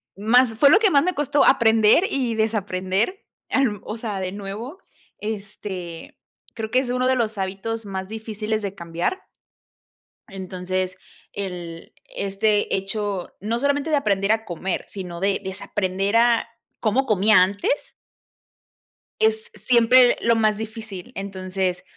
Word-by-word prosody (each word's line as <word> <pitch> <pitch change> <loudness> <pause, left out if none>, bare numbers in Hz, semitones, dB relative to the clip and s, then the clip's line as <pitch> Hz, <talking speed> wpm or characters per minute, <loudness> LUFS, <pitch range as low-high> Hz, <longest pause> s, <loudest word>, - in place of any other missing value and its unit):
más 235 +5 +4
fue 280 - +7
lo 390 - +7
que 420 -4 +3
más 280 +1 +5
me 365 +1 0
costó 290 -1 +2
aprender 225 - +5
y 250 -5 -1
desaprender, 210 - -1 0.2
em, 235 -8 +1
o 215 - -5
sea, 215 -4 -4
de 185 -1 -3
nuevo, 210 - -7 0.4
este, 195 -5 -6 0.4
creo 220 -2 -5
que 255 - +4
es 260 - -3
uno 255 0 +1
de 260 - +3
los 220 -3 -1
hábitos 200 +4 -3
más 190 -1 -4
difíciles 220 0 -3
de 200 -1 -4
cambiar 170 - -3 1.1
Entonces 185 -1 -4 0.4
el 175 -4 -6 0.2
este 205 +1 0
hecho 195 -1 -3
no 225 +4 -1
solamente 285 +3 0
de 300 - +3
aprender 200 -6 +1
a 220 0 0
comer, 180 +1 -3
sino 180 -3 -7
de 195 +1 +1
desaprender 195 +1 -2
a 235 0 +4 0.3
cómo 250 +5 +1
comía 210 -2 +5
antes 205 - -1 1.3
es 220 0 +1
siempre 240 +3 +5
lo 230 0 +3
más 215 -1 +2
difícil. 220 -4 -7
Entonces, 185 -1 -3
210 Hz, 135 wpm, -23 LUFS, 190-235 Hz, 1.3 s, fue